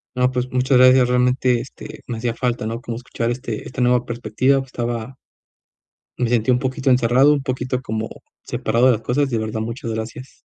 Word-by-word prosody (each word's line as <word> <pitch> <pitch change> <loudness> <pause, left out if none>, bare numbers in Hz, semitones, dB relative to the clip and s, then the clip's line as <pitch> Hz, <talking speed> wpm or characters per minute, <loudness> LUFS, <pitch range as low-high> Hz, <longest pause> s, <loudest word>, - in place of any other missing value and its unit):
No, 125 0 +2
pues, 125 0 -2
muchas 130 +1 +2
gracias. 130 0 +6
Realmente, 125 0 +2
este, 130 - -10
me 115 -2 -4
hacía 120 0 -2
falta, 120 -3 -2
¿no?, 115 +2 -4
como 115 -1 -5
escuchar, 120 -1 -3
este 120 -3 -5
esta 130 - -6
nueva 125 0 +3
perspectiva 120 +3 +1
estaba 120 -1 -4 1.0
Me 125 - +1
sentí 115 0 +2
un 125 - +4
poquito 130 +1 -1
encerrado, 125 +3 +4
un 145 - 0
poquito 130 -1 -2
como 110 -3 -4 0.3
separado 115 +3 +1
de 130 - +6
las 110 - -1
cosas. 135 +4 0
De 115 - 0
verdad, 110 0 -3
muchas 115 0 -5
gracias. 115 +4 -7
125 Hz, 190 wpm, -21 LUFS, 115-130 Hz, 1.0 s, gracias